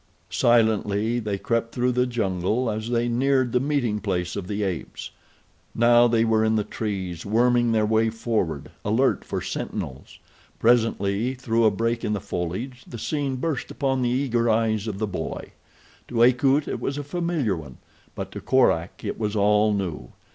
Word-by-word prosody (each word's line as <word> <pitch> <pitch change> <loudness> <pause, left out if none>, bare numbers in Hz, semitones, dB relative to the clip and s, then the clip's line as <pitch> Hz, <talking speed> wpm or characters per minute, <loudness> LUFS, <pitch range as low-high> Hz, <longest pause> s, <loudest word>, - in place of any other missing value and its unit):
Silently 110 -1 +2
they 105 -3 -2
crept 115 +2 -2
through 125 +1 +1
the 125 +1 +1
jungle 110 +1 -1
as 110 +2 -4
they 120 0 +1
neared 130 +1 +2
the 125 - +2
meeting 130 -6 0
place 90 -4 -2
of 100 -3 -5
the 105 +1 -2
apes. 95 -4 -4 0.6
Now 120 +1 +5
they 115 -1 +2
were 110 -1 +2
in 110 0 +2
the 105 - +1
trees, 95 -6 -4
worming 120 +2 +2
their 110 -1 +2
way 110 +1 +2
forward, 110 - -2
alert 115 +6 +1
for - - -4
sentinels. 65 +1 -5 0.4
Presently 115 0 +2
through 115 -2 +1
a - - +7
break 115 +3 -1
in 105 - 0
the 105 - -1
foliage 95 +10 -4
the 120 - -8
scene 140 +2 -2
burst 140 +1 -3
upon 135 -3 -1
the 120 - +1
eager 120 -2 +1
eyes 110 -1 +1
of 105 -3 -3
the 110 - -1
boy. 90 -6 -5 0.6
To 115 -1 +2
Akut 135 +4 +3
it - - -3
was 140 - -2
a 145 - -3
familiar 160 - -1
one; 75 -6 -9 0.4
but - - -5
to - - -7
Korak 95 -10 +1
it - - -4
was 105 -1 -2
all 105 +1 +3
new. 90 -11 -3
115 Hz, 175 wpm, -24 LUFS, 105-125 Hz, 0.6 s, a